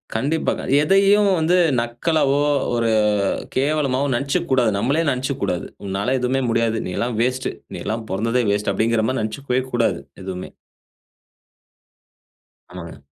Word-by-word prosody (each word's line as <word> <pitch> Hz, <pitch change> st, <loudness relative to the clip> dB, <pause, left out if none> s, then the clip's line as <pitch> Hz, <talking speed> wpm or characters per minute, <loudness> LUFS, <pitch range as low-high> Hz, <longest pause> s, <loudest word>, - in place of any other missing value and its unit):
கண்டிப்பாக. 145 Hz, +8 st, -1 dB, 0.2 s
எதையும் 200 Hz, +5 st, +4 dB
வந்து 160 Hz, +3 st, +2 dB, 0.2 s
நக்கலாவோ, 140 Hz, +4 st, +1 dB, 0.3 s
ஒரு 115 Hz, -1 st, +1 dB, 0.6 s
கேவலமாவோ 140 Hz, -1 st, +1 dB
நெனைச்சுக்க 140 Hz, +3 st, -1 dB
கூடாது. 125 Hz, -4 st, +3 dB
நம்மளே 135 Hz, +10 st, +1 dB
நெனைச்சுக்க 130 Hz, +1 st, -2 dB
கூடாது 90 Hz, -, -1 dB, 0.2 s
"உன்னால 100 Hz, +6 st, -1 dB
எதுவுமே 130 Hz, +2 st, 0 dB
முடியாது. 115 Hz, -1 st, +1 dB
நீ -, -, -4 dB
எல்லாம் 120 Hz, -2 st, -2 dB
வேஸ்ட். 130 Hz, +2 st, 0 dB, 0.2 s
நீ -, -, -5 dB
எல்லாம் 110 Hz, +1 st, -3 dB
பொறந்ததே 115 Hz, +6 st, 0 dB
வேஸ்ட் 100 Hz, 0 st, 0 dB
அப்டிங்கிற 110 Hz, +2 st, +1 dB
மாரி 130 Hz, +1 st, -1 dB
நெனைச்சுக்கவே 125 Hz, +4 st, -2 dB
கூடாது" 120 Hz, -1 st, +1 dB, 0.2 s
எதுவுமே. 95 Hz, -1 st, -6 dB, 2.2 s
ஆமாங்க. 85 Hz, -2 st, -9 dB
125 Hz, 125 wpm, -21 LUFS, 110-140 Hz, 2.2 s, எதையும்